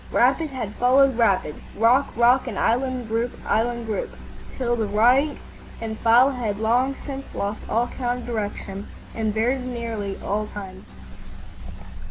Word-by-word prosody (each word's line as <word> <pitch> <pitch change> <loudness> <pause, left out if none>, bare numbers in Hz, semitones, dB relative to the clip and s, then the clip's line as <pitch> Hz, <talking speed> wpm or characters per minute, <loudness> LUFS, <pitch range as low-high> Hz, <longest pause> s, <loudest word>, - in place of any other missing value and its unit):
Rapid 320 -2 +3
had 245 -6 -5
followed 265 +1 +4
rapid, 200 -10 +1 0.2
rock 240 +6 +4
rock, 245 +3 +4
and 220 - -4
island 255 0 0
group 230 +2 -1
island 235 +1 0
group, 215 -2 -3 0.5
till 240 -2 0
the 220 -3 -1
rank 245 +8 +3 0.4
and 225 -1 -4
file 240 +4 +5
had 230 -6 -3
long 245 +5 +1
since 275 -1 -7
lost 205 +2 -3
all 230 +2 +2
count 245 0 -3
of - - -9
direction 205 -3 -4 0.3
and 220 -1 -1
very 235 +5 +1
nearly 230 -5 -4
of 210 +1 -2
time. 190 -2 -9
235 Hz, 145 wpm, -23 LUFS, 215-255 Hz, 0.5 s, file